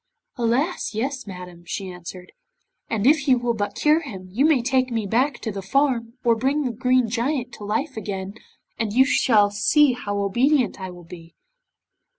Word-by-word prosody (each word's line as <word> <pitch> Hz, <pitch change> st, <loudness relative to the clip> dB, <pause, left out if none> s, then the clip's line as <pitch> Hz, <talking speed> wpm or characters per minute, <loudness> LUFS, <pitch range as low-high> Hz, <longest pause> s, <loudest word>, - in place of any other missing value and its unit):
'Alas! 250 Hz, +4 st, -1 dB
yes, 260 Hz, +2 st, -3 dB
madam,' 180 Hz, -2 st, -9 dB
she 190 Hz, +2 st, -5 dB
answered, 180 Hz, 0 st, -9 dB, 0.6 s
'and 220 Hz, -2 st, -1 dB
if 290 Hz, +1 st, +4 dB
you 260 Hz, -2 st, +5 dB
will 240 Hz, -1 st, 0 dB
but 205 Hz, -2 st, -3 dB
cure 305 Hz, +1 st, +3 dB
him, 195 Hz, -, -8 dB
you 250 Hz, +9 st, +2 dB
may 310 Hz, -4 st, +4 dB
take 260 Hz, 0 st, +1 dB
me 225 Hz, -3 st, -2 dB
back 240 Hz, +6 st, +1 dB
to 220 Hz, -, -4 dB
the 200 Hz, -1 st, -5 dB
farm, 235 Hz, +1 st, 0 dB
or 235 Hz, -1 st, +4 dB
bring 270 Hz, +6 st, 0 dB
the 255 Hz, -, -1 dB
Green 250 Hz, +1 st, +2 dB
Giant 250 Hz, +2 st, -2 dB
to 210 Hz, -, -10 dB
life 240 Hz, +8 st, -2 dB
again, 195 Hz, -2 st, -5 dB, 0.5 s
and 220 Hz, -3 st, -1 dB
you 260 Hz, +3 st, +5 dB
shall 215 Hz, -7 st, +3 dB
see 285 Hz, +6 st, +4 dB
how 205 Hz, -4 st, -4 dB
obedient 240 Hz, +4 st, +1 dB
I 185 Hz, -, -5 dB
will 175 Hz, -1 st, -11 dB
be. 165 Hz, -1 st, -13 dB
230 Hz, 180 wpm, -23 LUFS, 200-265 Hz, 0.6 s, you